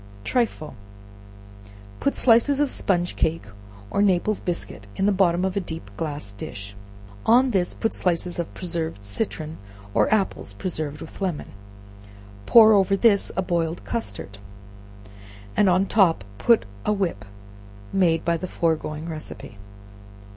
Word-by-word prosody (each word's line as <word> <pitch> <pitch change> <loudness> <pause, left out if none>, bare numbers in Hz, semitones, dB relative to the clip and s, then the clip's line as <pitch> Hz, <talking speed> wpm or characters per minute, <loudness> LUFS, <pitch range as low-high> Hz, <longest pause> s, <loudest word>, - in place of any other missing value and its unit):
Trifle. 220 - -1 1.3
Put 280 - 0
slices 250 +4 +4
of 290 -2 +2
sponge 175 -2 0
cake 160 +1 0 0.5
or 200 - +1
Naples 200 +1 +2
biscuit 170 - -4
in 195 - 0
the 205 - +4
bottom 185 -2 +2
of 190 - -2
a - - +2
deep 165 -3 -6
glass 150 -9 -5
dish; 100 0 -8 0.5
on 250 +3 +4
this 185 -4 +1
put 225 - -1
slices 175 0 0
of 170 - -3
preserved 165 - -4
citron, 155 - -4 0.3
or - - +2
apples 215 -3 0
preserved 155 -5 -3
with 160 - -10
lemon; 180 -6 -2 1.0
pour 220 -2 +8
over 195 -1 +3
this 205 -2 +3
a 190 - +1
boiled 170 -2 -2
custard, 100 - -5 1.2
and 205 -2 +4
on 185 +1 +4
the 195 - -6
top 180 - +3 0.2
put 235 -2 +4 0.2
a - - +1
whip 185 - -1 0.7
made 170 -4 +2
by 170 0 +2
the 185 - -5
foregoing 160 -2 -2
receipt. 155 -7 -7
180 Hz, 140 wpm, -24 LUFS, 160-200 Hz, 1.3 s, pour